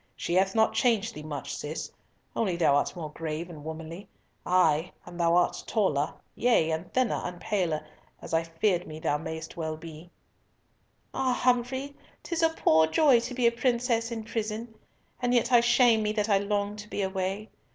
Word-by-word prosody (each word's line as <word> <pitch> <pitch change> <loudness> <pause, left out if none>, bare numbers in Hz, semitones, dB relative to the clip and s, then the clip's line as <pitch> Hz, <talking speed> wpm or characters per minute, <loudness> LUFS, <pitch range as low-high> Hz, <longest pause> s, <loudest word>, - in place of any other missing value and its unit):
"She 170 - -3
hath 190 +2 +2
not 220 0 +3
changed 230 -2 +1
thee 150 - -8
much, 150 -2 -5
Cis, 150 +2 -5 0.4
only 195 -6 0
thou 160 -5 +3
art 145 - 0
more 160 -4 -6
grave 165 +2 -5
and 150 -3 -10
womanly, 160 +4 -7 0.4
ay, 180 -2 +3
and 175 0 -10
thou 170 0 +3
art 175 - +2
taller, 150 -10 +1 0.2
yea, 230 -10 +2
and 160 +3 -4
thinner, 255 -3 +1
and 180 -1 -5
paler, 175 -8 -1 0.3
as - - -9
I 165 - +4
fear 170 +2 0
me 155 -2 -9
thou 150 -1 0
mayest 160 +1 -7
well 160 -1 -3
be." 160 +1 -11 1.0
"Ah, 260 -1 +1
Humfrey, 255 +3 0 0.3
'tis 335 -1 -2
a 325 - +5
poor 160 - +3
joy 270 - +5
to 240 +2 -5
be 250 -1 +1
a 235 - +6
princess 235 -1 0
in 225 -1 -4
prison! 220 +1 -4 0.5
And 245 0 +2
yet 240 - +2
I 240 -1 +7
shame 240 -1 +4
me 210 0 0
that 215 0 -1
I 200 -1 +4
long 205 0 -1
to 210 0 -9
be 205 - -2
away. 190 +2 -3
195 Hz, 185 wpm, -28 LUFS, 165-235 Hz, 1.0 s, I